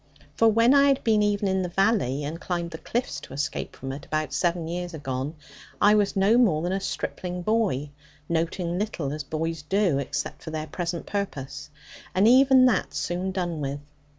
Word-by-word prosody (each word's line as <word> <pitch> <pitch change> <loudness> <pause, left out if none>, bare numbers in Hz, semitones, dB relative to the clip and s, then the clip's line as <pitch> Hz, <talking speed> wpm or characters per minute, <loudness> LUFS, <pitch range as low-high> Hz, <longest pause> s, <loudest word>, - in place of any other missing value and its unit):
For 225 - +4
when 230 +3 +5
I 280 0 +6
had 275 -1 +2
been 220 -2 +3
even 205 -1 +1
in 190 0 +1
the 180 - -2
valley, 185 - +1
and 160 +4 -5
climbed 175 -2 -3
the 160 - -7
cliffs 240 +2 -2
to - - -11
escape 145 +2 -3
from 135 0 -6
it, 140 +2 -7
about 155 0 -2
seven 170 -2 0
years 175 0 -4
agone, 135 +1 -4 0.4
I 205 - +6
was 205 -2 +2
no 200 +5 +4
more 170 -10 +3
than 175 - -1
a 195 - 0
stripling 180 -2 -4
boy, 190 - 0 0.4
noting 170 +1 -1
little, 175 -10 -2
as 150 -1 -4
boys 160 +2 -3
do, 180 -2 +1
except 140 +1 -4
for - - -7
their 155 -1 -3
present 170 +2 -4
purpose, 145 -7 -4 0.5
and 195 +3 +5
even 260 +1 +7
that 250 - +1
soon 180 +2 -2
done 175 -4 -2
with. 140 0 -3
175 Hz, 190 wpm, -26 LUFS, 155-205 Hz, 0.5 s, even